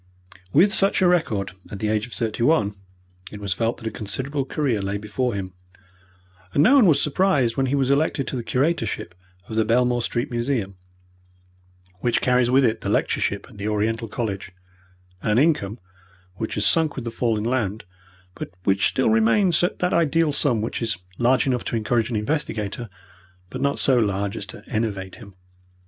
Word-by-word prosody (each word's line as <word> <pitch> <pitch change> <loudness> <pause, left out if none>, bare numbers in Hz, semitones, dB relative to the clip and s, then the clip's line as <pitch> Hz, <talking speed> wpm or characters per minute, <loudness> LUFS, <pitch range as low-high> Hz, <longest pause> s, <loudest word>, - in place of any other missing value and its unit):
With 190 - +5
such 195 -1 +3
a - - +5
record 115 - +1 0.2
at 105 - -6
the 105 +2 -2
age 110 +1 0
of 120 - -12
thirty 110 +3 -3
one, 120 -6 +3 0.6
it 105 - -8
was 100 -3 -2
felt 115 +4 -1
that 115 - -12
a 110 - -2
considerable 135 +7 -2
career 130 -7 -1
lay 100 +1 -2
before 110 +3 -2
him, 95 -2 -5 1.0
and 145 - +5
no 255 - +6
one 265 -8 +6
was 150 -4 +4
surprised 145 -7 +1
when 135 -1 +1
he 135 - 0
was 135 -1 +1
elected 140 -1 +1
to 130 - -4
the 120 - -3
curatorship 130 - -1 0.3
of 110 - -6
the 110 - +4
Belmore 120 +2 +2
Street 120 +4 -2
Museum, 120 -5 -2 1.2
which 120 +5 +1
carries 125 -1 +2
with 130 +1 +4
it 115 -1 0
the - - -3
lectureship 100 0 0
at 105 -6 -15
the 100 - -3
Oriental 110 +2 -1
College, 100 -4 -4 0.7
and 105 - 0
an - - +2
income 130 -8 +2 0.6
which 110 +4 -4
has 105 - +1
sunk 160 -3 +3
with 130 - -5
the 115 - -3
fall 115 -1 0
in 105 - -3
land, 110 -4 -1 0.5
but - - -7
which 95 +1 +2
still 130 -4 +1
remains 135 - +3
at 175 - 0
that 180 0 0
ideal 165 -1 +2
sum 125 -6 +1
which 115 - -3
is 115 -6 -1 0.2
large 125 +2 +3
enough 125 -3 0
to - - -2
encourage 115 +1 0
an 120 - -3
investigator, 110 -2 -2 0.6
but - - -5
not 140 0 +1
so 130 -2 +4
large 100 -2 -1
as 100 - -5
to - - -11
enervate 100 -4 -3
him. 100 -4 -13
115 Hz, 190 wpm, -23 LUFS, 105-140 Hz, 1.2 s, no